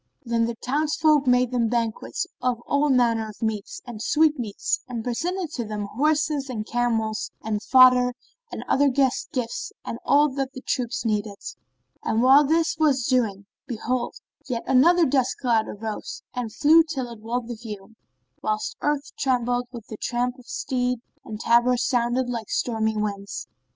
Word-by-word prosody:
Then 230 -1 +1
the 235 0 -3
townsfolk 300 +3 +1
made 250 0 +3
them 235 -3 +1
banquets 230 -2 -2 0.2
of 250 -2 0
all 285 +1 +2
manner 230 -4 +2
of 210 - -12
meats 215 -2 -3
and 235 -4 -8
sweetmeats 300 - +1
and 240 -3 -4
presented 335 +8 -2
to 250 -6 -3
them 210 -1 -4
horses 300 0 +1
and 215 -4 -4
camels 225 -2 -1
and 215 -1 -2
fodder 250 0 +6 0.4
and - - -5
other 280 +1 +3
guest 265 -1 +1
gifts 245 -3 -3
and 230 - -5
all 295 +1 +4
that 270 0 -3
the 260 - -8
troops 250 -3 -2
needed. 210 -2 -1 0.7
And 225 +1 +1
while 270 +3 +7
this 320 +2 +1
was 275 -6 +3
doing, 215 -7 +1 0.2
behold, 245 +1 -2 0.3
yet 235 -2 -2
another 335 +7 +5 0.4
cloud 230 -4 +2
of 210 - -8
dust - - -11
arose 220 -1 -5
and 245 -3 -3
flew 315 +8 +6
till 275 -7 -4
it 230 - -10
walled 235 +1 -3
the 240 - -4
view, 215 -2 -9 0.5
whilst 430 +1 -2
earth 295 -1 -1
trembled 245 -2 0
with 235 -4 -9
the 215 - -8
tramp 245 +3 -2
of 245 - -17
steed 250 -1 -1 0.3
and 215 -1 -7
tabors 240 +2 +3
sounded 245 +1 +1
like 230 -3 -4
stormy 220 -2 0
winds. 200 -1 -4
245 Hz, 165 wpm, -24 LUFS, 225-275 Hz, 0.7 s, while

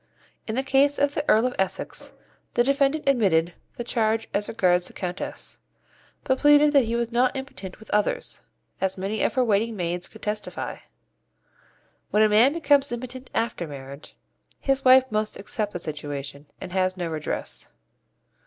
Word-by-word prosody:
In 220 - -2
the 265 - 0
case 275 +1 +3
of 285 0 +2
the 295 - -1
Earl 220 +3 +5
of 255 - 0
Essex 190 -1 -2 0.4
the 240 - +4
defendant 275 +3 +1
admitted 180 -10 +3 0.2
the 240 - -3
charge 225 -1 0
as 205 +1 0
regards 180 -4 +2
the - - -13
Countess, 180 -1 -5 0.6
but 260 -1 +1
pleaded 295 0 +6
that 275 -4 +5
he 230 +1 -1
was 235 0 -1
not 250 +3 +2
impotent 200 -9 -7
with 220 - -14
others, 210 0 -1 0.4
as 190 0 0
many 200 +3 -2
of - - +1
her 255 - +3
waiting 220 +1 +1
maids 175 0 -3
could 220 - -16
testify. 210 0 -4 1.3
When 215 - +4
a 215 - +5
man 225 +6 +6
becomes 285 -4 +3
impotent 255 +2 -6
after 220 -7 -1
marriage, 140 0 -10 0.4
his 270 0 0
wife 260 0 +8
must 215 0 -1
accept 205 +1 -3
the - - -4
situation, 145 -3 -6
and - - -7
has 185 0 0
no 175 -2 -2
redress. 150 - -3
220 Hz, 165 wpm, -25 LUFS, 180-260 Hz, 1.3 s, wife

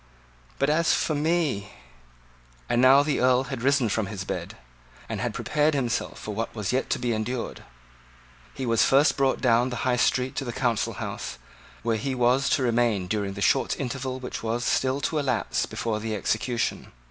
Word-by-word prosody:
But 140 +2 +2
as 165 +2 +3
for 155 - 0
me 150 -9 0 0.5
" - - -30
And 120 - +2
now 135 +2 +7
the 145 0 0
Earl 130 0 +4
had 125 - -4
risen 135 -1 +3
from 105 -1 -1
his 100 -2 -5
bed, - - -5 0.5
and - - -4
had - - -1
prepared 150 0 +1
himself 120 -3 -1
for 105 - -6
what 115 +3 -4
was 105 +1 -2
yet 130 - 0
to - - +1
be 120 -1 -1
endured. 115 +3 -3 0.9
He 135 - -5
was 115 -2 +3
first 140 +3 +4
brought 135 -1 +1
down 120 0 +3
the 125 - -4
High 125 -1 +2
Street 125 +1 +1
to - - -1
the 120 - -4
Council 120 -4 0
House, - - -5 0.5
where 115 -1 +1
he 130 +4 -2
was 125 +2 +2
to 150 -4 +2
remain 115 -5 +1
during 100 0 -2
the 100 - -7
short 135 +5 +2
interval 130 0 -3
which 125 - -6
was 115 +2 -2
still 130 +1 +1
to 155 +2 0
elapse 140 -3 0
before 110 -2 -2
the 110 0 -3
execution. 115 +4 -1
125 Hz, 190 wpm, -26 LUFS, 110-135 Hz, 0.9 s, now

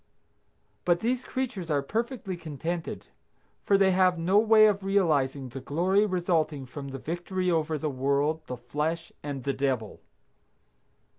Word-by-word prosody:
But 175 0 +2
these 250 +2 0
creatures 235 -10 -4
are 145 -2 +1
perfectly 225 - -3
contented, 165 +1 -5 0.6
for 200 - +3
they 195 -1 +4
have 185 -1 +3
no 185 +5 +3
way 220 0 +6
of 200 -2 +2
realizing 145 -9 +1
the 130 +3 -7
glory 185 +9 +2
resulting 165 -6 0
from 140 +2 -8
the 135 0 -6
victory 175 +5 -2
over 160 -1 0
the 155 - -2
world, 140 +3 0
the 125 - -5
flesh 150 +7 -3
and 140 -3 -5
the 140 - 0
Devil. 130 -6 -2
165 Hz, 145 wpm, -28 LUFS, 140-190 Hz, 0.6 s, way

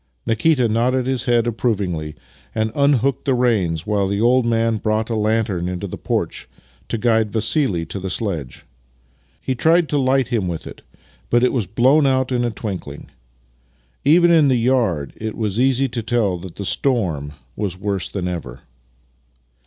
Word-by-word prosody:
Nikita 125 +3 +2
nodded 120 +3 +1
his 130 -1 -1
head 120 -2 +2
approvingly 95 -10 -2 0.4
and 110 0 0
unhooked 140 -2 +1
the 135 -3 +2
reins, 100 -11 +1
while 105 -2 0
the 100 +1 -1
old 120 +2 +3
man 115 -1 +1
brought 110 +2 -1
a - - 0
lantern 105 -5 0
into 90 +2 -4
the 95 - -6
porch - - -3 0.4
to - - -1
guide 110 -2 +1
Vassili 110 - 0
to 85 +5 -6
the 95 0 -4
sledge. 85 - -4 0.7
He 130 - -2
tried 160 +6 +3
to 145 - 0
hght 130 -1 +2
him 110 -7 0
with 85 -2 -4
it, - - -10 0.5
but 120 +1 +3
it 125 - +3
was 115 -8 -1
blown 130 - +3
out 130 -1 +1
in 120 -1 +1
a 120 - +1
twinkling. 95 -10 -7 0.9
Even 170 +4 +5
in 160 -4 +5
the 130 - +3
yard 115 - 0
it 110 -1 -5
was 110 -1 -2
easy 135 +1 +2
to 115 0 -3
tell 105 -6 0
that 90 -1 -10
the 100 - -5
storm 90 - -1 0.2
was 100 -4 -3
worse 100 -3 -2
than 90 -3 -3
ever. 65 -8 -6
115 Hz, 170 wpm, -20 LUFS, 95-125 Hz, 0.9 s, Even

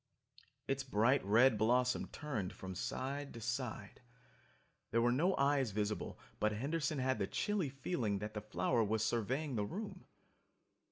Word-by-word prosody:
Its 135 0 0
bright 130 +2 +3
red 110 +3 +5
blossom 125 +3 +2
turned 130 -12 -4
from 95 0 -7
side 140 +9 -3
to - - -6
side. 120 +2 -4 0.9
There 115 - +2
were 120 +1 +4
no 170 +10 +3
eyes 140 -2 +3
visible 105 +1 -2 0.2
but 105 0 +2
Henderson 145 +6 -1
had 130 -2 +1
the 100 - 0
chilly 205 -8 0
feeling 130 - -1
that 105 +2 -5
the 105 - -4
flower 115 +2 +1
was 110 +1 +1
surveying 130 +6 0
the 105 - +1
room. 190 - -6
125 Hz, 150 wpm, -36 LUFS, 110-140 Hz, 0.9 s, red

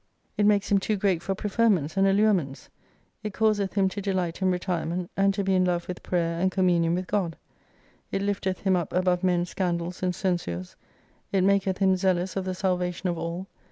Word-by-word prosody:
It 205 - +3
makes 205 -1 +2
him 200 - +5
»5i - - -16
too 215 - 0
great 190 -4 +1
for 195 +1 -2
preferments 200 -7 +1
and 195 0 +4
allurements. 195 -9 +1 0.5
It 210 -3 -5
causeth 210 -3 +1
him 195 -2 +3
to 200 - -5
delight 185 -3 -2
in 190 - +3
retirement: 180 -1 -2
and 195 0 +3
to 200 - -1
be 190 0 +1
in 185 -1 +3
love 175 -1 0
with 180 - -6
prayer 170 -2 -1
and 185 +1 +2
communion 175 -3 +2
with 185 +1 -2
God. 180 -5 -1 0.7
It 195 - -1
lifteth 195 -2 -1
him 190 -1 +2
up 175 -3 -2
above 180 0 +1
men's 180 -1 +1
scandals 175 -1 -2
and 180 -1 0
censures. 130 - -2 0.6
It 195 -2 +2
maketh 195 -1 +2
him 190 -1 +3
zealous 185 -1 0
of 190 -1 -2
the 185 -1 -2
salvation 180 -1 -1
of 170 -1 -2
all. 170 +3 -4
185 Hz, 200 wpm, -26 LUFS, 175-195 Hz, 0.7 s, him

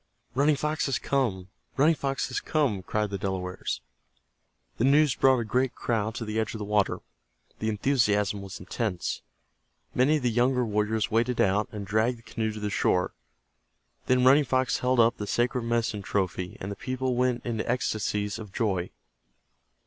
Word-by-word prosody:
"Running 145 +4 +3
Fox 150 +2 -1
has 135 - +1
come! 100 -10 -1 0.3
Running 150 +4 +5
Fox 135 -4 -2
has 130 - -1
come!" 140 -11 0
cried 105 +2 -2
the 100 - -3
Delawares. 95 -2 -3 1.0
The - - +2
news 145 +1 +5
brought 130 -1 +4
a 120 - -1
great 125 +4 0
crowd 110 -1 -1
to 115 - -4
the 110 +1 -2
edge 110 - -2
of - - -3
the 105 - -5
water. 105 -1 +1 0.6
The 110 - -1
enthusiasm 105 -4 +1
was 95 0 -8
intense. 95 0 -3 0.7
Many 140 +5 +3
of 145 - -6
the 120 - +2
younger 125 +2 +2
warriors 105 +1 0
waded 115 +2 +1
out, 100 +2 +2
and 105 -2 -6
dragged 110 +5 +1
the 115 - -19
canoe 110 -1 -2
to 105 - -7
the 105 -1 -3
shore. 90 -2 +1 0.9
Then 125 0 +3
Running 140 +3 +7
Fox 130 0 +1
held 125 0 +1
up 115 +1 +4
the 105 - -5
sacred 120 +1 0
medicine 115 -3 0
trophy, 95 -2 -2
and 95 - -5
the - - -4
people 130 +1 -2
went 125 0 0
into 115 -2 -2
ecstasies 105 -4 -1
of 105 -3 -9
joy. 95 -5 -1
115 Hz, 175 wpm, -27 LUFS, 105-130 Hz, 1.0 s, Running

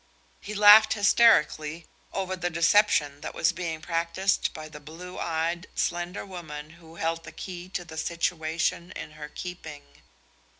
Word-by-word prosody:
He 210 - -7
laughed 210 +1 +8
hysterically 170 -7 +3 0.3
over 190 -1 -2
the 175 -1 -2
deception 165 -4 +3
that - - -6
was - - +2
being 170 -3 -4
practiced 170 +4 0
by 155 0 -8
the 150 -1 -11
blue 165 +5 -10
eyed, 170 +1 -2
slender 175 +2 -2
woman 155 -5 -8
who 165 -1 -16
held 165 0 -2
the - - -10
key 180 -1 -8
to 180 -2 -4
the 160 -1 -10
situation 170 +1 -1
in - - -7
her 150 -1 -9
keeping. 150 - -9
170 Hz, 145 wpm, -27 LUFS, 155-180 Hz, 0.3 s, laughed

